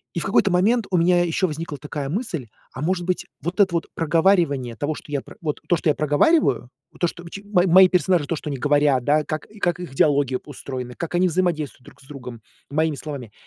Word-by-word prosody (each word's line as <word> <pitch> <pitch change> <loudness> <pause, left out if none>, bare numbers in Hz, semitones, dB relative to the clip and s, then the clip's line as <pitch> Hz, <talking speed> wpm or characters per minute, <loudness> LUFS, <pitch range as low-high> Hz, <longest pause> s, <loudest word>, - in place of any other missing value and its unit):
И - - -1
в - - -2
какой-то 195 0 +3
момент 210 +5 +2
у 180 - +2
меня 175 +1 +4
еще 175 +3 +1
возникла 150 -2 -5
такая 145 -1 -5
мысль: 165 - -3 0.2
"А 130 - -7
может 175 +2 -1
быть, 185 - -1 0.2
вот 175 +5 -3
это 190 -3 +4
вот 170 -1 -1
проговаривание 165 -7 +2
того, 150 +2 -2
что 150 - -11
я 140 - 0
про - - -14
вот, 150 -3 -3
то, 175 - +4
что 160 - -1
я 150 - +4
проговариваю, 145 - +2 0.2
вот - - -21
то, 175 - +3
что 175 0 -7
чи 200 +3 -9
мои 190 -3 +2
мои 185 +2 +7
персонажи- 180 -4 +2
то, 165 - -2
что 150 - -6
они 140 - -3
говорят, 145 -2 +2
да, 150 +1 +2
как 155 -1 -4
как 175 0 0
их 175 -7 -7
идеология 140 -2 +2
устроена, 130 -3 -7
как 170 +1 -5
они 180 +1 +3
взаимодействуют 160 -7 -1
друг 140 -1 -16
с 135 - -19
другом 125 -5 -9 0.3
моими 155 0 0
словами- 135 -9 -7
155 Hz, 225 wpm, -22 LUFS, 145-180 Hz, 0.3 s, мои